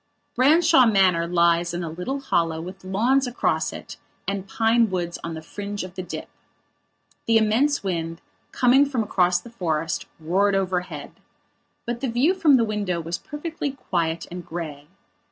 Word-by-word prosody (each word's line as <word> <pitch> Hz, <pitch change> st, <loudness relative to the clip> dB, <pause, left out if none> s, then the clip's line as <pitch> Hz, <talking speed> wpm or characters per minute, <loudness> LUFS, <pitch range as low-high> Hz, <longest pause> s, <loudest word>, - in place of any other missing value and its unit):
Branshaw 270 Hz, -1 st, +5 dB
Manor 185 Hz, -5 st, +3 dB
lies 170 Hz, 0 st, +2 dB
in 175 Hz, -, -3 dB
a 165 Hz, -, -4 dB
little 260 Hz, -, -4 dB
hollow 165 Hz, -11 st, 0 dB
with 185 Hz, +3 st, -8 dB
lawns 240 Hz, +8 st, +2 dB
across 245 Hz, -, 0 dB
it -, -, -9 dB, 0.3 s
and 195 Hz, -1 st, -3 dB
pine 225 Hz, +1 st, +3 dB
woods 175 Hz, -2 st, -3 dB
on 165 Hz, -1 st, -4 dB
the 160 Hz, -, -8 dB
fringe 205 Hz, +4 st, -5 dB
of 185 Hz, -1 st, -8 dB
the 185 Hz, -, -5 dB
dip. 180 Hz, -, -7 dB, 1.0 s
The 225 Hz, 0 st, +5 dB
immense 230 Hz, +7 st, +2 dB
wind, 165 Hz, -3 st, -3 dB, 0.3 s
coming 255 Hz, +2 st, +5 dB
from 255 Hz, -5 st, -1 dB
across 180 Hz, -3 st, +2 dB
the 230 Hz, -, -13 dB
forest, 165 Hz, -7 st, -2 dB
roared 195 Hz, +5 st, +2 dB
overhead. 185 Hz, -2 st, -2 dB, 0.7 s
But 240 Hz, 0 st, -4 dB
the 270 Hz, -, -1 dB
view 255 Hz, +10 st, +3 dB
from 315 Hz, -8 st, +5 dB
the 230 Hz, -, +2 dB
window 205 Hz, -5 st, -2 dB
was 165 Hz, +1 st, -4 dB
perfectly 295 Hz, -1 st, -5 dB
quiet 170 Hz, -10 st, -2 dB
and 180 Hz, 0 st, -6 dB
grey. 155 Hz, -4 st, -7 dB
190 Hz, 160 wpm, -24 LUFS, 170-240 Hz, 1.0 s, Branshaw